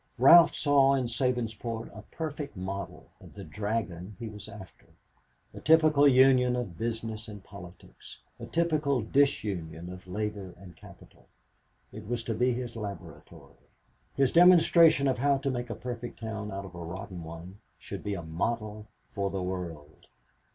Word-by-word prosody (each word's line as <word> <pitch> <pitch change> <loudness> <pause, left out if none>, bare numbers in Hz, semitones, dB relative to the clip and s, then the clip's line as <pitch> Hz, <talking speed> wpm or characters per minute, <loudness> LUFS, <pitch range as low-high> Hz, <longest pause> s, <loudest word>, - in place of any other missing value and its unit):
Ralph 165 +7 +8
saw 140 -2 +4
in 130 -2 0
Sabinsport 115 -2 -3
a - - -8
perfect 145 - -6
model 95 +1 -6 0.2
of - - -15
the - - -8
dragon 105 -3 -4
he 115 -2 -6
was 105 -1 -9
after, 105 -4 -13 0.7
a - - -9
typical 155 -2 +5
union 130 -2 +5
of 120 -9 -4
Business 110 +1 -4
and 105 -3 -10
Politics, 90 -3 -13 0.2
a - - -8
typical 155 -7 0
disunion 95 - -1
of 90 0 -13
labor 100 -1 -4
and 90 -2 -14
capital. - - -17 0.7
It 110 -1 -9
was 120 0 -2
to 115 - -2
be 125 +3 +1
his 120 -1 -4
laboratory. 95 -8 -10 0.5
His 135 -2 +2
demonstration 170 -4 +6
of 130 -2 0
how 140 +1 +3
to 135 0 -2
make 120 -1 -4
a 115 - -4
perfect 120 -1 -7
town 110 -2 -5
out 100 0 -5
of 95 - -11
a 85 0 -8
rotten 90 +1 -7
one 85 +4 -10 0.2
should - - -8
be 100 -1 -2
a 85 - -6
model 105 +6 -3 0.2
for 100 +6 -3
the 95 -1 -3
world. 85 -5 -7
110 Hz, 160 wpm, -29 LUFS, 95-130 Hz, 0.7 s, Ralph